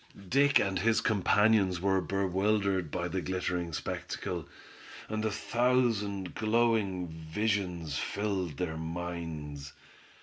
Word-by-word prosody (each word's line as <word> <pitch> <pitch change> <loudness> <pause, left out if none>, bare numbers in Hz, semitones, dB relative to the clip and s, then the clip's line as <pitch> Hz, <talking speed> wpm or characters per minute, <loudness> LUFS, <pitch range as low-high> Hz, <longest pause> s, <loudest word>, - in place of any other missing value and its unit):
Dick 140 +1 +5
and 95 -1 +1
his 110 +3 +3
companions, 105 -2 +3
were 95 0 +2
bewildered 95 0 +1
by 85 +3 -2
the 90 +1 -2
glittering 90 -2 -2
spectacle, 75 - -4 0.6
and 110 0 -2
a 110 - +2
thousand 110 -4 +1
glowing 110 -5 +1
visions 85 -1 -2
filled 95 -7 -2
their 80 -2 -2
minds. 80 -4 -5
95 Hz, 105 wpm, -31 LUFS, 85-110 Hz, 0.6 s, Dick